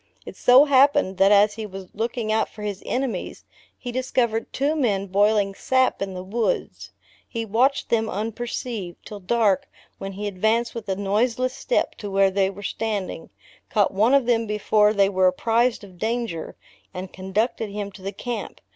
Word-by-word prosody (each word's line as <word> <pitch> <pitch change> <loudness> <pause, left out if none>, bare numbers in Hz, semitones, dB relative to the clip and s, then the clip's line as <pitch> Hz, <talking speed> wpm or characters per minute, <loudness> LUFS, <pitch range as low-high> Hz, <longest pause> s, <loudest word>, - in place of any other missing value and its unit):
It - - -9
so 255 +4 +6
happened, 280 -7 +4
that 195 +1 +5
as 205 0 +5
he 220 -1 -6
was 190 -1 -10
looking 225 0 -2
out 220 0 +1
for 210 - -10
his 205 -2 -4
enemies, 250 -7 -3 0.3
he 245 - -6
discovered 235 -3 -1
two 285 +3 0
men 210 -10 0
boiling 200 +1 +2
sap 260 +4 +1
in 195 -1 -3
the 180 - -5
woods. 210 +1 -2 0.4
He 230 -1 -4
watched 250 +7 +1
them 225 -1 +1
unperceived, 220 -2 -5
till 210 - -8
dark 205 0 +1 0.3
when 195 0 -6
he 205 +2 -5
advanced 220 +4 0
with 225 -3 -7
a 190 - +1
noiseless 230 +6 0
step - - -1
to 205 - -5
where 195 0 +3
they 190 0 +2
were 200 +1 -10
standing, 210 -3 -3 0.4
caught 205 -3 +2
one 220 +7 +4
of 275 -3 +3
them 230 -2 +1
before 210 0 +3
they 200 -2 +3
were 190 -1 +3
apprized 230 +5 +1
of 185 -3 -14
danger, 225 -6 -3 0.4
and 185 +1 -6
conducted 210 +4 -2
him 200 0 -5
to 195 - -14
the 195 +1 -4
camp. 240 +4 -6
215 Hz, 175 wpm, -23 LUFS, 195-235 Hz, 0.4 s, so